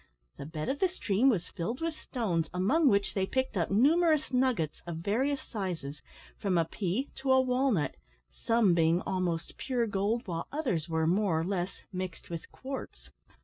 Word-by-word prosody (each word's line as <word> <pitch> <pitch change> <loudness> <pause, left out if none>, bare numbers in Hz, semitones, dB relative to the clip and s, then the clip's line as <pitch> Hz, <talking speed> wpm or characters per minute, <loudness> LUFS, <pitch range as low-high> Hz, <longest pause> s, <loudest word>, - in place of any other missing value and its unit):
The 140 - -6
bed 155 -1 -4
of 280 - -1
the 375 - +3
stream 245 - +2
was 185 -8 0
filled 205 +7 -3
with 330 0 -1
stones, 195 - -2
among 270 - +3
which 200 -2 +2
they 190 -1 0
picked 260 +1 -1
up 170 -3 0
numerous 305 - +3
nuggets 250 - +1
of 170 -2 -4
various 250 - 0
sizes 175 - -5 0.4
from 190 -3 +1
a 165 - +3
pea 200 - -2
to 265 0 0
a 260 - +6
walnut 255 - +1 0.4
some 230 -5 +2
being 165 +1 +3
almost 180 -4 -2
pure 250 -3 0
gold, 210 +3 0
while 165 -3 -4
others 240 - -1
were, 160 -1 +1
more 180 -1 +2
or - - 0
less, 185 0 -3
mixed 185 -2 -5
with 165 -1 -6
quartz. 270 0 -7
200 Hz, 175 wpm, -30 LUFS, 170-260 Hz, 0.4 s, a